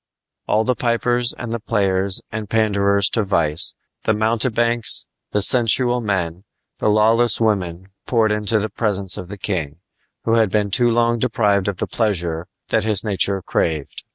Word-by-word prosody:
All 110 - +2
the 125 - +1
pipers 120 0 0
and 120 -1 -6
the 115 - -2
players 100 -3 0
and 110 -2 -5
panderers 100 -2 +2
to 115 - +1
vice, 85 -6 +1 0.3
the 110 - +2
mountebanks, 115 +1 0 0.2
the 105 - 0
sensual 120 +1 +3
men, 95 -6 -1
and 90 +3 -23 0.4
the - - +1
lawless 115 +3 +3
women 95 -5 -1 0.2
poured 115 -3 +2
into 105 +1 +1
the 105 0 -2
presence 100 -4 +1
of 90 - -7
the 100 +2 -8
king, 80 -7 -3 0.5
who 115 - 0
had 110 -3 +3
been 105 0 0
too 120 +4 +3
long 120 0 +2
deprived 105 -5 +1
of 100 -3 -2
the - - -1
pleasure 85 -6 -1 0.2
that - - +1
his 105 -3 +2
nature 100 -2 +1
craved. 80 -4 -2
105 Hz, 165 wpm, -20 LUFS, 95-115 Hz, 0.5 s, sensual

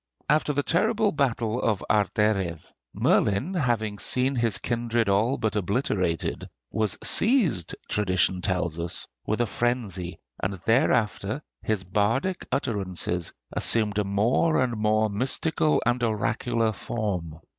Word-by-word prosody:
After 150 0 +2
the 145 0 0
terrible 215 - +2
battle 120 -5 0
of 105 -4 0
Arderydd, 100 -5 +1 0.3
Merlin, 100 - +1
having 115 - -1
seen 130 +6 +1
his 115 -4 +1
kindred 120 -1 -1
all 105 +7 +2
but 110 -1 -1
obliterated, 95 -4 -1 0.2
was 110 -3 0
seized, 195 - +3
tradition 95 -2 +1
tells 90 -3 -1
us, 85 0 -2 0.2
with 110 +2 0
a - - +3
frenzy, 105 -7 -2 0.2
and 95 +1 -1
thereafter 115 +1 +1 0.2
his 110 -3 -1
bardic 110 - 0
utterances 95 - -2 0.2
assumed 105 -2 +1
a - - +2
more 110 +11 +2
and 120 -2 -1
more 110 0 +2
mystical 135 +8 +1
and 120 +1 +1
oracular 115 +1 0
form. 95 -8 -4
110 Hz, 125 wpm, -26 LUFS, 100-125 Hz, 0.3 s, seized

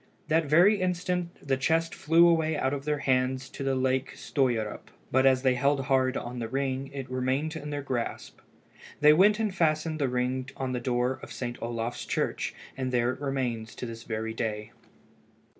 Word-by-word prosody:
That 160 +1 +3
very 185 +7 +5
instant 180 -2 -2
the 135 -1 +2
chest 165 +4 +1
flew 165 +3 +5
away 160 -2 +2
out 135 -1 0
of 140 0 -4
their 150 -1 0
hands 130 0 +1
to - - -6
the 135 -1 +1
lake 130 0 0
Stöierup, 120 -7 -1 0.2
but 130 +1 +4
as 130 -1 +3
they 130 -1 +4
all - - -5
held 140 0 +3
hard 130 -1 +2
on 120 +1 -5
the 115 - -3
ring 135 +2 -2
it 135 -2 -6
remained 130 +5 -1
in 150 -2 -6
their 145 -1 -3
grasp. 125 -4 -4 0.6
They 150 0 +7
went 205 +6 +5
and 215 -3 0
fastened 155 -2 +1
the 140 -3 +1
ring 125 +1 -1
on 130 -1 -2
the 125 - -1
door 125 +1 0
of - - -10
St. 120 -1 -5
Olaf's 115 0 -3
church, - - -1 0.2
and 130 -1 -3
there 120 0 +2
it 130 - -8
remains 125 -5 -2
to - - -5
this 115 -1 -7
very 110 0 -4
day. 105 -1 -3
130 Hz, 190 wpm, -28 LUFS, 125-155 Hz, 0.6 s, They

